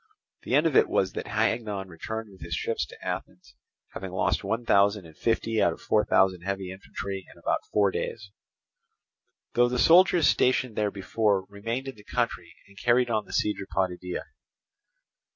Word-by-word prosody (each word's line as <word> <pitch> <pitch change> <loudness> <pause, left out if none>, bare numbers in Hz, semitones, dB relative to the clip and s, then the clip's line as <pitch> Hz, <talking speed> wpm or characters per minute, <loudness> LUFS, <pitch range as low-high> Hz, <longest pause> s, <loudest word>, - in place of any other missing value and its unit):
The 125 - 0
end 150 +3 +4
of 160 -5 +1
it - - +5
was 95 -1 +1
that - - -5
Hagnon 110 -3 -1
returned 110 +5 -6
with 95 - -17
his 85 0 -4
ships 80 -6 -2
to - - -13
Athens, - - -6 0.4
having 95 - -6
lost 95 +2 0
one 115 +4 -2
thousand 100 -2 +3
and 80 -1 -14
fifty 115 +1 0
out 85 - +3
of - - -13
four 105 - +2
thousand 95 -2 +3
heavy 95 0 -3
infantry 95 0 -6
in - - -18
about - - 0
forty 100 -2 +2
days; 105 -4 -6 1.2
though 120 0 +4
the 125 - -1
soldiers 175 +3 +6
stationed 125 -2 +2
there 105 -1 +1
before 100 0 0
remained 115 +6 -4
in 135 - -5
the 105 - -17
country 115 -8 -2 0.2
and 100 +1 -15
carried 120 0 +3
on 110 -2 0
the - - -13
siege 105 -1 0
of 95 - -7
Potidæa. 90 -1 -2
105 Hz, 180 wpm, -27 LUFS, 95-115 Hz, 1.2 s, soldiers